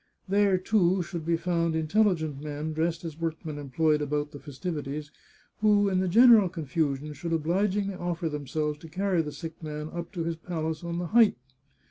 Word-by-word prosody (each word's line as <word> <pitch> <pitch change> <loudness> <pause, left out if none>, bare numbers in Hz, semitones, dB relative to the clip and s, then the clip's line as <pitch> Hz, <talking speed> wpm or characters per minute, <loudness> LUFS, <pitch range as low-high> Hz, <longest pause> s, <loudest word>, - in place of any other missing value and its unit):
There, 200 0 +3
too, 185 -2 +2
should 170 -2 -6
be 170 0 +2
found 170 -1 0
intelligent 160 -3 +1
men, 150 +1 -4
dressed 165 +1 -1
as 160 -1 -7
workmen 160 -2 -3
employed 150 +2 +1
about 145 0 -1
the 145 - -9
festivities, 150 0 -5 0.5
who, 205 -1 +4
in 185 -1 +1
the 185 - +1
general 225 0 +7
confusion, 150 -3 -2
should 165 +4 -4
obligingly 195 +5 0
offer 175 -1 -3
themselves 150 0 -2
to 165 - -11
carry 185 +1 +1
the 150 -2 -5
sick 160 +3 -8
man 150 -1 -5
up 170 0 -6
to 170 -3 -2
his 165 0 -2
palace 160 -2 -4
on 170 0 -3
the 175 - -2
height. 230 -2 +6
165 Hz, 175 wpm, -28 LUFS, 150-180 Hz, 0.5 s, general